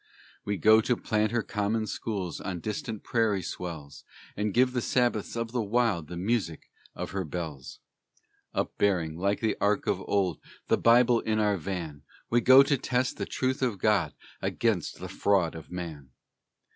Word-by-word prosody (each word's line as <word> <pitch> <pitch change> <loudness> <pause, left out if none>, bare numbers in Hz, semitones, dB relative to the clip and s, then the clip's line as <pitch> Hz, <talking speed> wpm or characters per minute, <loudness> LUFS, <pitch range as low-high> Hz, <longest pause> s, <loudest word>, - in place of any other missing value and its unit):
We 100 0 -1
go 110 +5 +6
to 120 +1 0
plant 105 0 0
her 120 -2 0
common 110 +2 -1
schools 100 -6 -4
On 95 -2 -4
distant 110 +3 -5
prairie 110 -5 +1
swells, 80 -5 -7 0.3
And 105 0 -1
give 125 +4 +3
the 125 - 0
Sabbaths 120 -4 0
of 115 -1 -3
the 125 -1 0
wild 105 -6 +1
The 85 - -7
music 95 -4 -2 0.2
of - - -5
her 95 0 -2
bells. 80 -5 -6 0.7
Upbearing, 90 -6 0
like 100 +4 0
the 110 -2 +1
Ark 105 0 +2
of 95 -1 0
old, 95 -5 +1 0.3
The - - +3
Bible 120 0 +5
in 110 -1 -1
our 105 -1 +2
van, 85 -5 -5 0.3
We 120 +1 +4
go 130 +3 +8
to 140 -1 +1
test 125 +1 -1
the - - -3
truth 130 +1 -1
of 120 -6 0
God 95 -5 +1 0.3
Against 110 -8 -1
the - - -7
fraud 95 -5 +1
of 80 -2 -10
man. 80 -6 -7
105 Hz, 170 wpm, -28 LUFS, 90-115 Hz, 0.7 s, go